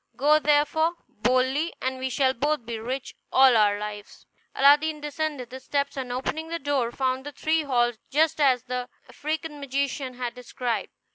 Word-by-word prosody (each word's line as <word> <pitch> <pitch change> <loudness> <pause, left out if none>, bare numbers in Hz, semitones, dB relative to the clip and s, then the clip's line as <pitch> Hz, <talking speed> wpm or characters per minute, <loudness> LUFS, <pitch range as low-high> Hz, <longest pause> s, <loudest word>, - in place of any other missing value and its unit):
Go, 300 +3 +5
therefore, 300 +2 +2
boldly, 255 +8 0
and 260 0 -2
we 260 0 -2
shall 260 +1 +2
both 290 0 -1
be 230 -1 -4
rich 255 +4 -4 0.2
all 260 -2 +6
our 205 -2 +4
lives." 205 0 -8 0.3
Aladdin 295 +3 +5
descended 295 -4 -4
the 260 - -7
steps, 280 +2 -2
and, 260 -3 -4
opening 310 +6 -3
the 335 +1 -3
door, 275 -6 0
found 260 0 -1
the 290 - -7
three 315 +2 0
halls 240 -5 +1
just 310 +1 +2
as 255 -4 +4
the 250 0 -4 0.2
African 310 0 -4
magician 275 -1 -2
had 245 -1 -4
described. 250 -1 -3
265 Hz, 165 wpm, -26 LUFS, 250-295 Hz, 0.3 s, all